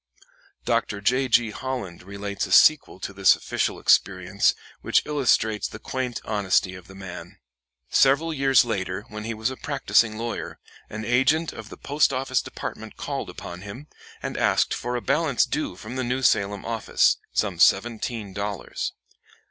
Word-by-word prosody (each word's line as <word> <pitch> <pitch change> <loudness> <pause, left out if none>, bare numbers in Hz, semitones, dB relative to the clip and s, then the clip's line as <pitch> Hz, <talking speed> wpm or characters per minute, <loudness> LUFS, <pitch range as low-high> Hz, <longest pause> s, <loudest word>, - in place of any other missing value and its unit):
Dr. 105 - 0
J. 125 +6 +1
G. 120 -2 +3
Holland 125 -7 -5
relates 100 +1 -4
a - - -10
sequel 155 -11 +5
to 100 - -5
this 100 0 +5
official - - -2
experience 95 +1 +2 0.3
which - - +2
illustrates 120 -8 +1
the - - -9
quaint 125 +2 -4
honesty 95 -3 +1
of 90 -1 -12
the 95 - -13
man. 90 -1 -9 0.5
Several 145 +5 +4
years 135 -3 +4
later, 95 -3 -3
when 105 0 -7
he 115 0 -3
was 110 +4 -1
a 130 - -7
practicing 120 -6 +1
lawyer, 115 +1 -4 0.3
an 110 +1 -6
agent 130 +8 +2
of 110 0 -9
the - - -10
Post 145 0 +1
office 135 0 0
Department - - -7
called - - -4
upon 85 +1 -8
him, 100 +8 -9 0.4
and - - -4
asked - - +2
for 125 +1 -3
a 120 - -2
balance 150 -3 +2
due 150 - -3
from 110 +7 -8
the 130 - -1
New 125 +2 -2
Salem 100 -4 +2
office, 115 -1 +2
some 95 -5 -1
seventeen 110 +1 +2
dollars. 100 -1 -4
110 Hz, 160 wpm, -24 LUFS, 100-130 Hz, 0.5 s, sequel